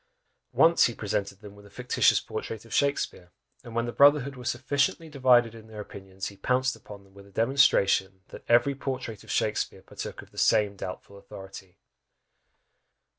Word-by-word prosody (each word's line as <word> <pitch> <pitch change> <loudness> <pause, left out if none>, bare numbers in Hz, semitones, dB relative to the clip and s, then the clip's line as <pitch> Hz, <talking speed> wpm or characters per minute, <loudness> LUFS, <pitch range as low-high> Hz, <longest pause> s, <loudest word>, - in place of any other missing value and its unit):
Once 165 +1 +5
he 120 - -1
presented 100 -1 -3
them 105 -2 -11
with 100 - -16
a 100 - -16
fictitious 125 +4 +2
portrait 110 0 -7
of 115 - -11
Shakspeare, 140 -10 -1 0.3
and 115 -1 -10
when 115 0 0
the 120 - -4
brotherhood 140 0 +4
were 125 - -10
sufficiently 145 +5 -1
divided 125 -5 +3
in 110 -1 -13
their 110 -1 -10
opinions, 95 -2 -7
he 100 - -15
pounced 130 +2 0
upon 105 -3 -13
them 95 0 -23
with 100 0 -15
a - - -19
demonstration, 100 -6 +2
that - - -11
every 120 +4 +4
portrait 130 -5 -5
of - - -17
Shakspeare - - -1
partook - - -8
of - - -20
the - - -8
same 105 -1 +3
doubtful 100 +1 -8
authority! 95 -1 -12
115 Hz, 175 wpm, -27 LUFS, 100-130 Hz, 0.3 s, Once